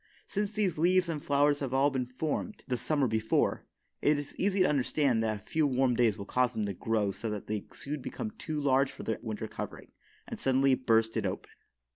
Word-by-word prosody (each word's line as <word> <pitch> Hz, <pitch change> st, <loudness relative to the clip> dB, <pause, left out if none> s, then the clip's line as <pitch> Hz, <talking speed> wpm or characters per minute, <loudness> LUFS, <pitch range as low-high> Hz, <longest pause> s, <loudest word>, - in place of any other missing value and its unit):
Since 205 Hz, +1 st, -2 dB
these 200 Hz, -7 st, 0 dB
leaves 180 Hz, +2 st, +4 dB
and 155 Hz, -3 st, -3 dB
flowers 145 Hz, 0 st, +3 dB
have 130 Hz, -2 st, -2 dB
all 140 Hz, +2 st, +4 dB
been 130 Hz, -2 st, -1 dB
formed 155 Hz, -, -3 dB
the 125 Hz, -, 0 dB
summer 145 Hz, +4 st, +1 dB
before, 110 Hz, 0 st, 0 dB, 0.3 s
it 150 Hz, 0 st, +3 dB
is 145 Hz, -1 st, -6 dB
easy 195 Hz, 0 st, +1 dB
to -, -, +6 dB
understand 135 Hz, -3 st, +2 dB
that 110 Hz, -1 st, 0 dB
a -, -, -30 dB
few 155 Hz, -2 st, +1 dB
warm 130 Hz, -1 st, +2 dB
days 115 Hz, -3 st, +2 dB
will 100 Hz, -, -6 dB
cause 125 Hz, +3 st, +1 dB
them 110 Hz, -, -1 dB
to 100 Hz, -, -2 dB
grow 105 Hz, +1 st, 0 dB
so 95 Hz, +4 st, -5 dB
that 105 Hz, -2 st, -4 dB
they 105 Hz, -1 st, -4 dB
soon 145 Hz, 0 st, -5 dB
become 220 Hz, -, -5 dB
too 155 Hz, -9 st, -4 dB
large 135 Hz, -1 st, +3 dB
for -, -, -9 dB
their 110 Hz, -, -2 dB
winter 110 Hz, -2 st, -4 dB
covering, -, -, -7 dB, 0.4 s
and -, -, -6 dB
suddenly 135 Hz, 0 st, +3 dB
burst 115 Hz, -3 st, +2 dB
it -, -, 0 dB
open. -, -, -5 dB
135 Hz, 215 wpm, -30 LUFS, 115-150 Hz, 0.4 s, to